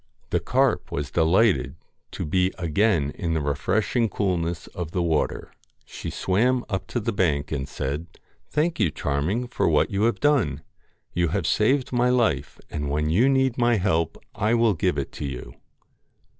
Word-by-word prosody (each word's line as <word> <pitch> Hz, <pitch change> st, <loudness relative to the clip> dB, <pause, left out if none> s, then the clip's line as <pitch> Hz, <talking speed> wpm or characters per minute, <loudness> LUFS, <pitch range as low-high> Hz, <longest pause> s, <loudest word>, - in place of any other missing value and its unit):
The -, -, +2 dB
carp -, -, +1 dB
was 70 Hz, 0 st, -3 dB
delighted 80 Hz, -, +3 dB, 0.4 s
to -, -, -4 dB
be 90 Hz, +4 st, +1 dB
again 85 Hz, -3 st, +1 dB
in 80 Hz, 0 st, -2 dB
the -, -, +1 dB
refresh 90 Hz, -, -1 dB
ing 115 Hz, -3 st, +3 dB
coolness 85 Hz, -4 st, -1 dB
of 85 Hz, -3 st, -6 dB
the 90 Hz, -, 0 dB
water. 80 Hz, -3 st, -1 dB, 0.3 s
She -, -, -7 dB
swam 125 Hz, +7 st, +1 dB
up 95 Hz, -3 st, -3 dB
to 120 Hz, -, -2 dB
the 115 Hz, +1 st, -1 dB
bank, 75 Hz, -7 st, 0 dB
and 70 Hz, -3 st, -3 dB
said 75 Hz, +5 st, -3 dB, 0.2 s
' -, -, -40 dB
Thank 155 Hz, +1 st, 0 dB
you, 100 Hz, -7 st, +3 dB
Charming, 75 Hz, -, -1 dB
for 120 Hz, -, 0 dB
what 80 Hz, +7 st, +2 dB
you 100 Hz, +2 st, +1 dB
have 115 Hz, -, +1 dB
done. 140 Hz, -, +2 dB, 0.5 s
You 85 Hz, 0 st, +1 dB
have -, -, -1 dB
saved 130 Hz, +5 st, +2 dB
my 120 Hz, 0 st, +3 dB
life, 125 Hz, -3 st, +1 dB
and 75 Hz, -2 st, -3 dB
when 75 Hz, +2 st, 0 dB
you 115 Hz, +11 st, +4 dB
need 130 Hz, -2 st, +2 dB
my 120 Hz, -1 st, +4 dB
help 85 Hz, -4 st, 0 dB, 0.2 s
I 110 Hz, +3 st, +1 dB
will 115 Hz, -2 st, +3 dB
give 80 Hz, -, 0 dB
it -, -, -5 dB
you.' 65 Hz, -4 st, -5 dB
90 Hz, 175 wpm, -24 LUFS, 75-115 Hz, 0.5 s, you